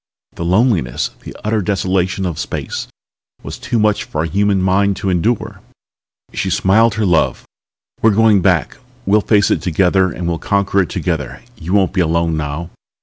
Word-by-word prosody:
The - - -6
loneliness, 90 - +1
the - - -11
utter 110 0 0
desolation 95 -1 -1
of 85 -5 -3
space, - - -4 0.6
was - - -7
too 125 -3 -2
much 105 -1 +1
for 75 - -3
a - - -1
human 100 +3 +1
mind 95 +2 +2
to 95 - -2
endure." 105 +6 -1 0.7
She - - -2
smiled 110 +4 +3
her 110 -2 0
love. 85 -4 +1 0.6
"We're 110 - +5
going 110 -1 +4
back. 90 -2 +1 0.3
We'll 105 +2 +3
face 105 -1 +2
it - - +1
together 95 +1 +2
and 85 - -5
we'll 85 -1 -2
conquer 100 -1 +1
it 90 - -2
together. 80 -8 -3
You 90 -3 -5
won't 95 -2 +2
be 95 - +1
alone 85 0 +1
now. 75 +3 -4
95 Hz, 170 wpm, -17 LUFS, 85-105 Hz, 0.7 s, We're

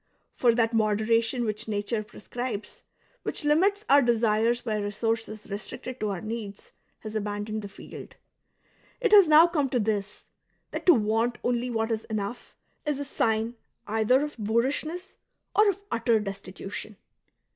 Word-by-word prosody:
For 235 -2 +3
that 230 -1 +2
moderation 225 +2 +2
which 215 +1 -3
nature 215 +1 -1
pre 210 - -14
scribes, 240 -2 -5 0.4
which - - -3
limits 390 +8 +3
our 285 +1 +7
desires 235 -1 +2
by 220 -3 -1
resources 215 +1 -2
I'estricted 240 +5 -6
to 215 - -1
our 190 -3 -3
needs, 215 -3 -6 0.3
has 215 -1 -7
abandoned 210 0 -3
the 205 - -6
field; 195 - -11 0.8
it 455 -4 +1
has 405 -4 +9
now 310 +2 +8
come 305 -6 0
to 250 - +1
this 210 -2 -2 0.2
— - - -45
that - - -5
to 355 - +10
want 225 +2 +1
only 245 0 0
what 225 -1 -1
is 220 -1 -2
enough 215 +1 -5 0.3
is 295 -3 -1
a 285 - -4
sign 225 -3 0 0.3
either 220 +6 +3
of 295 -5 -6
boorishness 270 - -1 0.4
or 420 0 +6
of 400 +1 -3
utter 230 -1 +2
destitution. 195 +1 -7
225 Hz, 155 wpm, -27 LUFS, 215-255 Hz, 0.8 s, to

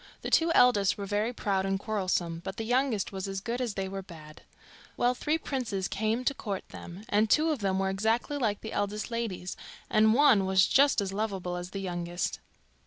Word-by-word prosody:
The - - -4
two 330 0 +4
eldest 210 -6 +4
were 200 - -4
very 210 +3 0
proud 200 -5 -1
and 195 0 0
quarrelsome, 185 -5 -1
but 190 - -6
the 225 - -3
youngest 245 -3 0
was 190 0 -4
as 195 0 -3
good 240 +5 -3
as 235 -5 -2
they 195 -1 -2
were 195 0 -5
bad. 160 -4 -13 0.6
Well, 245 +1 +3
three 300 +5 0
princes 235 - -3
came 220 +5 -1
to 280 - +2
court 200 -7 -5
them, 175 +4 -10
and 210 +1 +2
two 315 +6 +4
of 295 - -2
them 195 -2 0
were 190 0 0
exactly 225 +8 0
like 210 -5 0
the 220 - -6
eldest 205 +3 -2
ladies, 220 -6 -3 0.4
and 220 +1 +5
one 250 -9 +5
was 190 0 +5
just 275 -4 +4
as 195 -1 -3
lovable 195 -4 -2
as 180 0 -5
the 195 +1 -5
youngest. 175 -1 -3
205 Hz, 205 wpm, -29 LUFS, 190-235 Hz, 0.6 s, and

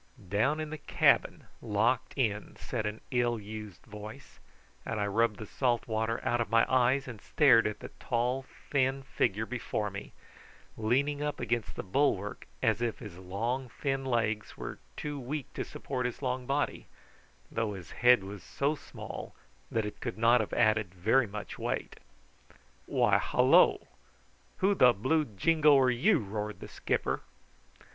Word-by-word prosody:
"Down 125 - +2
in 155 -1 -4
the 155 - -5
cabin - - +2 0.2
locked 115 +5 0
in," 105 -6 -1
said 110 -4 -3
an 105 +1 -5
ill 120 -2 +1
used 105 -3 -9
voice; 110 +5 -10 0.4
and 110 - -3
I 100 - +1
rubbed 105 +1 +1
the 110 - -7
salt 120 +2 0
water 110 0 -1
out 120 0 +2
of 115 - -2
my 115 0 +4
eyes, 130 +1 +2
and 115 -5 -8
stared 130 -8 +5
at 105 - -5
the - - -7
tall 125 +2 0 0.3
thin 135 -1 +1
figure 110 -5 0
before 110 -3 -3
me, 100 +1 -8 0.6
leaning 140 +6 +1
up 150 0 -2
against 120 -1 -2
the - - -4
bulwark 105 -2 0 0.2
as - - +2
if 120 -2 -1
his 100 -6 -10
long 115 +8 -3
thin 135 +2 -2
legs 110 -4 -1
were - - -6 0.2
too 145 -1 -4
weak 135 +2 -5
to - - -3
support 125 -2 -3
his 125 - -7
long 125 -1 -2
body, 140 +2 -1 0.6
though 115 -2 -1
his 90 -4 -9
head 125 -4 +5
was 100 0 -8
so 140 +2 -1
small 150 - -8 0.3
that 110 -2 0
it 105 - -7
could 120 -3 -4
not 115 +1 +5
have 110 - -5
added 110 -4 +2
very 110 +8 +3
much 105 +1 -7
weight. - - -3 0.9
"Why, - - +3
hallo! - - +4 0.7
Who 195 +2 +3
the 125 -10 +6
blue 150 +9 +1
jingo 150 +7 +4
are 130 -1 +4
you?" 125 - +3
roared 105 0 -4
the - - -8
skipper. - - -1
120 Hz, 160 wpm, -30 LUFS, 105-135 Hz, 0.9 s, the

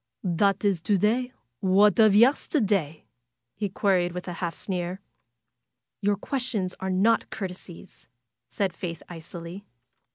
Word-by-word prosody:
^^That 195 +3 +1
is 195 -5 +2
to 200 +5 +2
day. 240 +6 +1 0.3
What 200 +4 +4
of 215 -2 +6
yesterday?'^ 210 - +2 0.5
he 205 - -3
queried, 185 -3 +1
with 180 +1 -6
a 180 - -4
half 170 -2 -2
sneer. 180 -1 -4 1.0
^^Your 205 0 +1
questions 235 -8 -2
are 190 0 -3
not 200 +5 +2
courtesies," 185 -3 -8 0.4
said 195 -3 -2
Faith, 170 -2 -6
icily. 170 +2 -8
190 Hz, 125 wpm, -26 LUFS, 175-210 Hz, 1.0 s, of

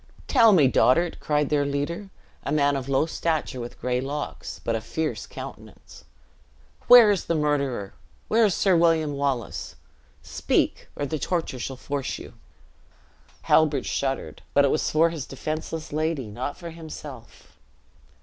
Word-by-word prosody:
"Tell 230 -5 +6
me, 160 -9 +6
dotard!" 165 +7 +3
cried 150 -1 0
their 145 -1 +2
leader, 145 +8 -3 0.3
a - - -3
man 145 -1 +2
of 135 -1 -4
low 135 +3 +2
stature, 160 -5 -2
with 120 0 -8
gray 125 0 -1
locks, 145 +2 -5
but 115 - 0
a 110 - -2
fierce 155 -5 -3
countenance, - - -11 0.8
"where 240 -4 +9
is 195 - -1
the 170 - 0
murderer? 140 -9 -1 0.3
Where 225 +1 +4
is 200 - +1
Sir 190 -3 +3
William 165 -3 +3
Wallace? 140 -5 -3 0.5
Speak, - - 0
or 145 - -2
the 155 +2 -3
torture 165 -7 -2
shall 130 +1 -5
force 140 0 -3
you." - - -11 1.1
Halbert 150 -4 +3
shuddered, 135 -1 -3
but 140 - +6
it 140 - +2
was 155 - 0
for 165 +2 +3
his 160 -5 -6
defenseless 155 +3 -5
lady, 155 -6 -1
not 125 +7 -5
for 170 -2 -8
himself. 155 -7 -11
150 Hz, 150 wpm, -25 LUFS, 135-165 Hz, 1.1 s, where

